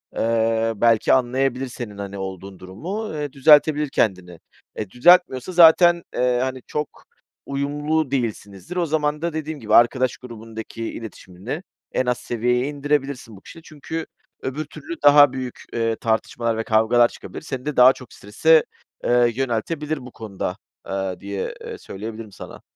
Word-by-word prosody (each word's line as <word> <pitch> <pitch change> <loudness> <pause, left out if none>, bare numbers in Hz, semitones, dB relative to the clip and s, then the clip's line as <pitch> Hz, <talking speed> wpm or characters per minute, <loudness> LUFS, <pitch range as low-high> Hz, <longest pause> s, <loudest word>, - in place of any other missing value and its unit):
eee, 115 0 +1
belki 115 +1 +3
anlayabilir 130 +1 +1
senin, 120 -4 -8
hani, 100 0 -6
olduğun 95 0 -7
durumu, 175 - -6
eee, 150 -2 -4
düzeltebilir 150 +1 +5
kendini, 90 -8 -1 0.4
eee, 105 - -4
düzeltmiyorsa 170 - +4
zaten, 175 0 +6
eee, 125 -1 +1
hani, 130 -1 -4
çok 150 -1 -2 0.6
uyumlu 145 +1 -1
değilsinizdir. 110 - -4
O 175 -1 +1
zaman 150 -1 -1
da 170 -1 -2
dediğim 155 -1 -4
gibi 110 -2 +1
arkadaş 125 +1 +4
grubundaki 115 -1 -9
iletişimini 110 - -8 0.3
en 130 - 0
az 125 -1 0
seviyeye 125 +2 -1
indirebilirsin 140 -6 -2
bu - - -16
kişiyle. 165 - -13
Çünkü 160 +1 -6 0.4
öbür 145 +4 -4
türlü 155 +3 -8
daha 145 -2 +7
büyük, 130 -2 -6
eee, 115 -1 0
tartışmalar 115 +1 -1
ve 115 - -1
kavgalar 115 +2 +4
çıkabilir. - - -10
Seni 135 -3 -6
de 150 -1 -3
daha 125 +1 +8
çok 125 -4 -14
strese, 155 +10 +3 0.4
eee, 120 -1 +3
yöneltebilir 140 +5 -2
bu 125 - -10
konuda, 100 -4 -5 0.3
ııı, 95 -1 -3
diye, 100 -1 -4
eee, - - -7
söyleyebilirim 110 +2 -8
sana. 95 - -11
125 Hz, 150 wpm, -22 LUFS, 110-150 Hz, 0.6 s, daha